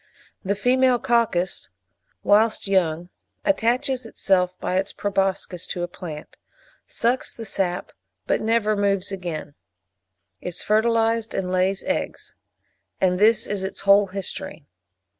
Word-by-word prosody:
The 200 +1 0
female 250 +3 +3
coccus, 225 - 0 0.5
whilst 215 +2 +3
young, 175 -3 +1 0.4
attaches 255 -2 +1
itself 185 -5 0
by 185 - -1
its 195 +1 -1
proboscis 195 -3 -1
to 175 - -3
a - - -1
plant; 165 -4 -9 0.5
sucks 245 +3 0
the 230 - -8
sap, 185 -3 -2 0.3
but - - +1
never 220 -1 +2
moves 200 -1 +1
again; 175 -6 -5 0.9
is 180 -1 -4
fertilised 225 +1 +2
and 180 -1 -2
lays 185 +1 +1
eggs; 285 - -3 0.7
and 180 -1 +2
this 215 +1 +5
is 200 -2 -3
its 190 - -4
whole 200 +1 +5
history. 190 -4 -5
195 Hz, 120 wpm, -23 LUFS, 180-225 Hz, 0.9 s, this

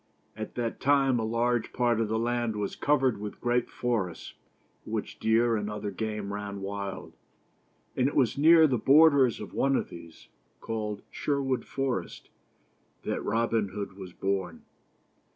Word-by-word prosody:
At 110 0 -7
that 120 -2 -3
time 135 -3 +3
a - - -1
large 115 +1 0
part 120 -2 +2
of 110 - 0
the 110 +1 -1
land 120 -1 -1
was 105 -1 -3
covered 135 -6 +2
with 105 0 -7
great 120 0 0
forests, 110 -9 -3 0.5
in - - -8
which - - -4
deer 115 +1 +3
and 105 -1 -2
other 105 -1 -4
game 105 0 -4
ran 100 -1 -5
wild; 100 0 -5 0.8
and 130 - +2
it 145 - -3
was 130 -5 +3
near 160 +3 +7
the 130 -6 +1
borders 140 -1 +5
of 105 - -8
one 135 0 +2
of - - -1
these, 85 -1 -12 0.3
called 105 -2 -4
Sher 140 -1 -1
wood 135 -2 -1
Forest, 135 -2 -3 0.7
that - - -2
Robin 115 -2 +1
Hood 100 -1 -5
was 95 -2 -9
born. 95 -2 -3
115 Hz, 160 wpm, -28 LUFS, 105-130 Hz, 0.8 s, near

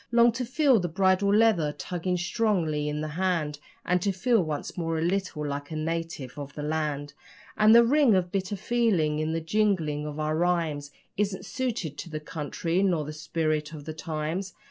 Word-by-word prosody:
Long 235 0 +6
to 250 +2 -3
feel 260 -1 +3
the 175 - -1
bridle 190 +3 +2
leather 210 -8 +4
tugging 180 +2 -2
strongly 175 -6 0
in 150 0 -3
the 155 - -2
hand 165 -3 -1 0.3
And 180 0 +2
to 200 - +1
feel 225 +3 +2
once 155 -4 -4
more 165 -2 -2
a - - -1
little 180 -4 -1
like 145 0 -4
a 160 - -5
native 160 -4 -4
of 140 -1 -7
the 150 - -5
land. 150 -2 -2 0.4
And 215 +1 +6
the 235 0 +8
ring 270 -3 +4
of 180 -1 0
bitter 195 +1 -2
feeling 195 -8 +1
in 155 +1 -1
the 165 - -1
jingling 165 -5 0
of 150 0 -6
our 155 0 0
rhymes 165 -4 0 0.3
Isn't 200 -1 -1
suited 225 - -3
to - - -6
the 155 -1 -4
country 165 +3 -2
nor 175 -6 +1
the 150 - -6
spirit 155 0 -2
of 145 -2 -9
the 155 - -5
times. 160 +4 -4
165 Hz, 190 wpm, -27 LUFS, 150-195 Hz, 0.4 s, the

